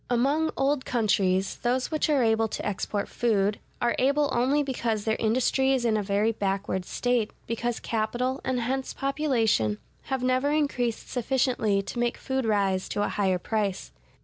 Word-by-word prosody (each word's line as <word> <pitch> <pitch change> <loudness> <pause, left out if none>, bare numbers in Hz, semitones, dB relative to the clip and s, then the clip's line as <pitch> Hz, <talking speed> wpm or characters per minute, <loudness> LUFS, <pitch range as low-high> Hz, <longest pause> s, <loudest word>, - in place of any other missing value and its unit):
Among 280 +6 +2
old 275 0 +1
countries, 195 -5 +1
those 250 +3 -1
which 310 0 0
are 285 -4 +3
able 225 0 +2
to - - -5
export 205 0 -2
food, 205 -3 +1 0.2
are 240 0 +1
able 280 +2 +2
only 270 +5 +2
because 235 -6 -2
their 220 -1 +1
industry 255 +4 +2
is 255 -3 0
in 225 -2 +2
a 215 - +1
very 205 +2 +1
backward 195 -3 -2
state, 245 -1 0 0.2
because 235 +1 -2
capital, 240 +4 -1
and 255 -2 -1
hence 260 +3 -2
population, 240 - +1 0.3
have 265 -2 -2
never 255 +2 +2
increased 260 -6 0
sufficiently 245 -5 +1
to 215 +5 -5
make 240 0 0
food 265 -2 -2
rise 195 -3 +1
to 205 - -1
a - - 0
higher 190 -3 +1
price. 200 0 -2
235 Hz, 165 wpm, -27 LUFS, 210-265 Hz, 0.3 s, are